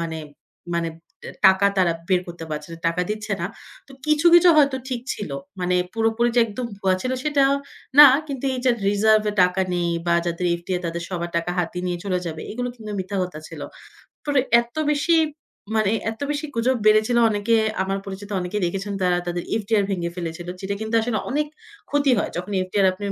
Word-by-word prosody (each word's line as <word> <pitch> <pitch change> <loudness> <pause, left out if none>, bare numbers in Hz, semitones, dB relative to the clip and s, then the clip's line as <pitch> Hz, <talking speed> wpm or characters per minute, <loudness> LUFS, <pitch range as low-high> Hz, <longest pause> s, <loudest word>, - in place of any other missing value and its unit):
মানে 165 -1 -3 0.6
মানে 170 -1 0 0.3
দে - - -8 0.2
টাকা 190 +1 +4
তারা 180 -2 +3 0.2
বের 185 -2 +3
করতে 175 -1 -8
পারছে 150 +2 -5
না। 165 - -8
টাকা 170 +2 -1
দিচ্ছে 210 0 -3
না। 170 - -1 0.4
তো - - -13
কিছু, 305 +2 +2
কিছু 345 +1 +7
হয়তো 280 -3 +4
ঠিক 250 -3 -3
ছিল। 205 - -6 0.3
মানে 180 0 +1 0.2
পুরোপুরি 225 +1 +1
যে - - +7
একদম 235 +3 -5
ভুয়া 190 -1 +2
ছিল 255 - -1
সেটা 290 -1 +2 0.6
না, 295 - +13 0.2
কিন্তু 275 -3 -5
এই - - -3
যে 255 - +5 0.2
রিজার্ভে 210 +1 +3
টাকা 180 +1 +2
নেই, 175 -1 0 0.2
বা 170 - +3
যাদের 170 +1 -1
FDR 180 +1 -3
তাদের 170 +1 -4
সবার 175 -2 -4
টাকা 170 +1 -1
হাতি 180 0 -2
নিয়ে 175 -1 -2
চলে 185 -2 0
যাবে, 160 -1 -5
এগুলো 245 +3 -3
কিন্তু 220 -3 -9
মিথ্যা 190 +2 -4
কথা 180 -4 -5
ছিল। - - -9 0.7
পরে 290 -2 +2 0.2
এত 235 0 -14 0.2
বেশি 300 +3 +2 0.6
মানে 215 -2 +2 0.2
এত 225 - -12
বেশি 295 +1 -3
গুজব 245 +3 +1
বেড়েছিল। 215 +3 +4
অনেকে 210 +2 +1 0.3
আমার 195 +1 -2
পরিচিত 200 +1 -8
অনেকেই 180 +3 -3
দেখেছেন, 195 +3 -3
তারা 180 -1 +3
তাদের 175 0 -2 0.2
FDR 210 0 +1
ভেঙে 175 -3 -2
ফেলেছিল। 170 0 -5
যেটা 200 +1 -3
কিন্তু 220 +1 -2
আসলে 225 -1 -1
অনেক 300 +2 0 0.4
ক্ষতি 285 -1 +2
হয়। - - -1
যখন 180 +4 -5
FDR 195 +1 +1
আপনের 200 +2 -5
200 Hz, 190 wpm, -23 LUFS, 180-235 Hz, 0.7 s, না